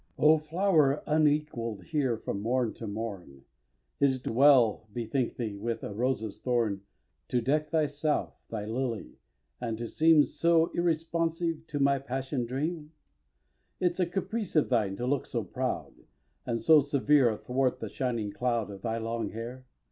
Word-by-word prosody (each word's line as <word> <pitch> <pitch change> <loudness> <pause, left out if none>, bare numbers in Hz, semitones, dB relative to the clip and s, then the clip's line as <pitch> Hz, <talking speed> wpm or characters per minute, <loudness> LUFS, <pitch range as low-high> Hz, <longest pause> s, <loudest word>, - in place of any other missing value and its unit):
xi. - - -4
O 155 +1 +7
flower 155 -3 +2
unequall'd 150 -9 +1
here 140 -7 0
from 100 -2 -4
morn 120 +1 0
to 115 - -7
morn, 100 -10 -6 0.6
Is't 130 -2 +1
well, 120 -4 +4
bethink 120 +3 -2
thee, 110 -4 -3
with 115 +3 -3
a 105 - -5
rose's 110 -2 -2
thorn 115 -6 0 0.5
To 125 - +1
deck 150 +5 0
thyself, 150 -1 0 0.2
thou 105 -2 -4
lily! 115 - -4 0.4
and 115 -2 -2
to 115 +1 -4
seem 160 +3 +5
So 165 +1 +2
irresponsive 165 -1 -1
to 145 - -3
my 140 0 +3
passion 130 -1 -3
dream? 150 +4 -3 0.9
Is't 180 0 0
a 180 - +2
caprice 200 +2 -3
of 155 - +3
thine 105 -6 +1
to 120 - -4
look 140 +1 0
so - - -2
proud, - - -3 0.5
And 115 -1 0
so 160 +3 +6
severe, 140 -1 +3
athwart 125 +4 -1
the - - -4
shining 120 -6 -2
cloud 115 -1 -1
Of 100 -1 -10
thy 115 +1 -2
long 115 +1 -3
hair? 120 +3 -7
130 Hz, 155 wpm, -29 LUFS, 115-155 Hz, 0.9 s, O